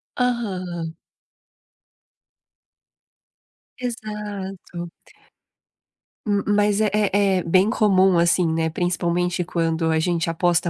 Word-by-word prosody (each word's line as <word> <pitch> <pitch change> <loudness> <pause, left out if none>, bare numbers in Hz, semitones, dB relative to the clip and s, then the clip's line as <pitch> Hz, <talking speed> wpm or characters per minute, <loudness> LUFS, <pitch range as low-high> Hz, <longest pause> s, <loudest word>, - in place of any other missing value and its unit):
Aham. 185 -9 -2 2.8
Exato. 210 -7 -6 1.4
M 205 -2 +1
m 210 - +1
mas 205 0 +2
é 215 - +3
é 200 -2 +2
é 180 - -1
bem 185 +5 +3
comum, 195 -5 +3
assim, 170 0 +3
né. 160 0 0
Principalmente 175 +1 -1
quando 165 -1 -1
a 160 - +2
gente 170 0 0
aposta 170 +1 +1
185 Hz, 95 wpm, -22 LUFS, 170-205 Hz, 2.8 s, é